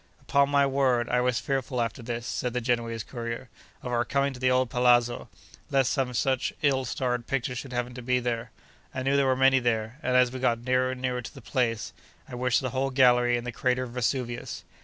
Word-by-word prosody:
Upon 140 +2 +2
my 140 -1 +4
word 130 -3 +1
I 125 0 +2
was 125 -1 +1
fearful 135 -2 -2
after 120 +2 -2
this 120 0 -4
(said 125 0 -2
the 125 - 0
Genoese 115 -2 -1
courier) 115 0 -6 0.3
of 125 - -4
our 120 0 +2
coming 140 +2 0
to 125 - -10
the 130 0 +2
old 125 -1 +2
palazzo, 120 -1 +2 0.4
lest 135 -2 +2
some 130 -3 -1
such 130 +1 +1
ill 135 -2 +2
starred 125 -1 -2
picture 130 -2 -1
should 125 +2 -6
happen 120 0 -3
to 125 - -8
be 125 +1 +1
there. 120 -1 -3 0.5
I 130 - -2
knew 135 +1 +2
there 140 -1 +3
were 130 - +3
many 135 0 +5
there; 120 +1 -1
and, 125 0 +2
as 125 -1 +4
we 130 - -6
got 120 -2 +1
nearer 130 0 +2
and 125 - -9
nearer 125 -1 -1
to 120 - -10
the - - -9
place, 115 -2 -1 0.3
I - - -12
wished 125 0 +1
the 130 -2 -3
whole 135 +1 0
gallery 125 -2 +4
in 120 - -5
the 125 - -4
crater 125 +1 0
of 125 - -7
Vesuvius. 125 0 -3
125 Hz, 225 wpm, -27 LUFS, 120-130 Hz, 0.5 s, many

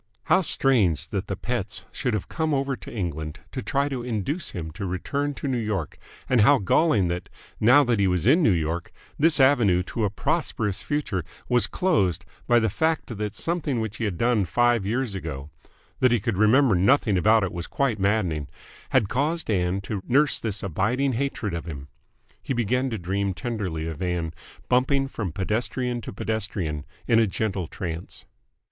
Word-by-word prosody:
How - - +4
strange 120 - +2
that - - -3
the - - -2
Petts - - -4
should 125 - -1
have 105 - -3
come 160 -2 -1
over 135 0 0
to - - -11
England 80 -6 -4
to 130 - -4
try 140 +2 0
to 135 -4 -3
induce 125 - -3
him 80 -3 -6
to 95 +5 -5
return 140 +11 -2
to 140 - -5
New 130 -3 0
York, 105 -8 -3 0.3
and 125 -3 +3
how 140 +7 +6
galling 105 - +3
that, 90 +1 -4 0.3
now 125 +6 +6
that 120 -5 +1
he 100 - +3
was 90 -1 0
in 150 +9 +5
New 150 - +4
York, 85 -1 -1 0.3
this 155 0 +4
avenue 120 -10 +4
to 110 +4 -3
a 105 - +2
prosperous 105 0 -1
future 130 - -2 0.2
was 125 -1 +3
closed 95 - +1 0.2
by 120 - +5
the 110 -1 +3
fact 160 - -1
that 105 0 -4
something 155 -3 -1
which 110 0 -3
he 115 - -2
had 95 -5 -2
done 115 -1 +2
five 120 +3 +2
years 120 0 -1
ago 75 -6 -6 0.5
that 130 -1 +4
he 120 - +3
could 110 +1 -1
remember 110 +5 +4
nothing 105 +3 +3
about 110 +4 +4
it 95 - -2
was 85 -1 -5
quite 130 -6 0
maddening 95 -8 0 0.4
had 105 - +3
caused 145 - -1
Ann 90 0 0
to 100 0 -4
nurse 140 +3 +3
this 105 -2 -3
abiding 120 - 0
hatred 120 -6 -2
of 85 - -4
him. 70 -4 -7 0.5
He - - -3
began 125 +3 +1
to 115 - -3
dream 95 +1 -2
tenderly 100 -10 -3
of 80 -3 -6
Ann, 90 -3 -2 0.3
bumping 135 +2 +2
from 105 -9 -4
pedestrian 120 - -2
to - - -7
pedestrian 100 -8 -3 0.2
in 115 -2 +5
a 115 - +4
gentle 95 -3 -2
trance. 85 -1 -6
110 Hz, 185 wpm, -25 LUFS, 90-130 Hz, 0.5 s, how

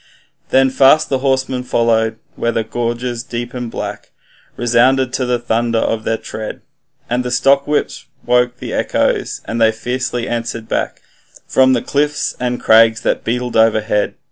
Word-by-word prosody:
Then 130 0 +3
fast 140 +4 +4
the 135 - 0
horsemen 130 -1 0
followed, 115 -2 +1 0.2
where 115 - -1
the 115 - -1
gorges 120 +1 -3
deep 120 -1 -6
and 125 -2 -5
black 105 -2 -6 0.5
Resounded 125 +2 +2
to 130 - -1
the 125 0 +1
thunder 115 0 -1
of 110 0 -1
their 115 - 0
tread, 110 -1 -7 0.5
And 125 +1 -1
the 125 - -3
stockwhips 140 +3 +1 0.2
woke 125 0 +2
the - - -6
echoes, - - 0
and 115 +1 -3
they 110 0 +5
fiercely 125 +1 -3
answered 115 -1 -4
back - - -3 0.4
From 130 0 +3
cliffs 150 +1 -1
and 125 -1 -2
crags 110 +1 +5
that - - -1
beetled 125 +1 -2
overhead. 110 -2 +2
120 Hz, 150 wpm, -17 LUFS, 115-130 Hz, 0.5 s, they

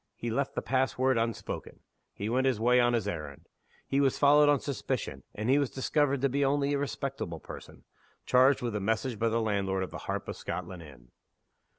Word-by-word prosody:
He 120 - -4
left 135 +4 -1
the - - -2
pass 130 0 0
word 130 -1 +2
unspoken; 115 0 -4 0.3
he 100 - -5
went 130 +4 +1
his 125 -5 +1
way 125 +2 +4
on 120 0 +3
his 115 - 0
errand; 75 -4 -6 0.4
he 140 +1 +1
was 135 -2 +2
followed 145 +1 +6
on 145 -1 +4
suspicion; 140 0 -3
and 105 +2 -3
he 135 +3 +4
was 140 -3 0
discovered 140 0 0
to 140 - +3
be 140 +2 0
only 140 +1 +1
"a 140 - 0
respectable 135 - -4
person," - - -11 0.4
charged 130 +1 +4
with 120 -3 -2
a - - 0
message 110 +3 -1
by 115 - +2
the 115 +1 +1
landlord 100 -3 0
of 95 - -6
the - - -7
Harp - - -2
of - - -4
Scotland 90 +1 -6
Inn! 65 -6 -15
125 Hz, 210 wpm, -29 LUFS, 105-140 Hz, 0.4 s, followed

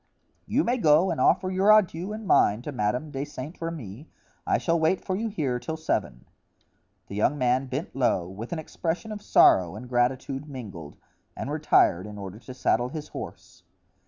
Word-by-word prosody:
"You - - +2
may 245 +2 +1
go 160 -2 +4
and - - -2
offer 185 +6 +3
your 190 +3 +4
adieux 190 -3 +3
and 215 0 -6
mine 110 - +3
to 150 - -5
Madame 125 +5 -1
de 135 0 -3
Saint 150 +3 -8
Remy. 150 - -6 0.4
I - - +3
shall 170 -1 +1
wait 160 +4 +1
for 185 - -1
you 225 +4 -2
here 140 - -2
till 160 +5 -5
seven." - - -2 0.8
The - - -10
young 105 +8 +1
man 130 0 +1
bent 135 +5 -5
low, 120 -9 +1
with 105 +6 -8
an 170 - -2
expression 165 +6 -4
of 210 -1 -6
sorrow 90 - +5
and 120 +4 -8
gratitude 130 +3 -1
mingled, 100 - -9 0.4
and - - -4
retired 90 +4 +3
in 105 0 -9
order 100 +1 -8
to 130 - -10
saddle 125 -1 +1
his 155 0 -7
horse. - - -9
135 Hz, 185 wpm, -26 LUFS, 120-165 Hz, 0.8 s, sorrow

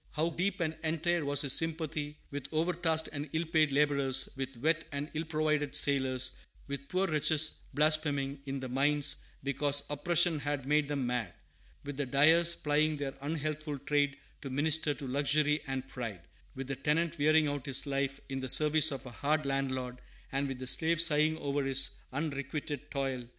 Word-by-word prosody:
How 160 +2 0
deep 185 +3 -1
and 160 -1 -1
entire 165 +1 0
was 145 0 +3
his 135 -2 +4
sympathy 155 -2 -1
with 140 -1 -6
overtasked 165 0 +1
and 145 0 -5
ill 160 +1 0
paid 155 -2 +2
laborers; 140 -2 +2
with 135 -1 -5
wet 160 +6 +1
and 140 +1 -5
illprovided 155 -2 -1
sailors; 130 -3 +3 0.3
with 140 0 -6
poor 185 +1 +1
wretches 155 -2 +2 0.2
blaspheming 145 -2 +1
in 135 0 -4
the 130 - -4
mines, 140 +3 +2 0.3
because 140 +1 +1
oppression 165 +2 +3
had 145 -2 -3
made 150 +1 +2
them 140 -3 -2
mad; 120 -6 -2 0.5
with 145 -1 -7
the 145 -2 -2
dyers 160 +6 +5
plying 150 +1 +1
their 140 -2 -4
unhealthful 155 0 -3
trade 145 +1 0 0.2
to 135 - -6
minister 145 +2 +1
to 140 - -8
luxury 150 +3 +1
and 135 0 -4
pride; 115 -9 -6 0.3
with 135 - -5
the 135 +1 -4
tenant 155 +4 -1
wearing 155 +1 +4
out 145 -1 -4
his 135 -2 0
life 140 -1 -2
in 135 -1 -4
the 130 -1 -4
service 155 +3 +4
of 135 -3 -6
a 125 - -8
hard 150 +5 -1
landlord; 130 -2 -2 0.3
and 140 +1 -1
with 135 -1 -5
the 130 - -7
slave 160 +5 +3
sighing 155 -1 +4
over 145 -2 -2
his 135 0 +2 0.2
unrequited 140 0 -4
toil! 135 -3 -3
145 Hz, 170 wpm, -31 LUFS, 135-155 Hz, 0.5 s, dyers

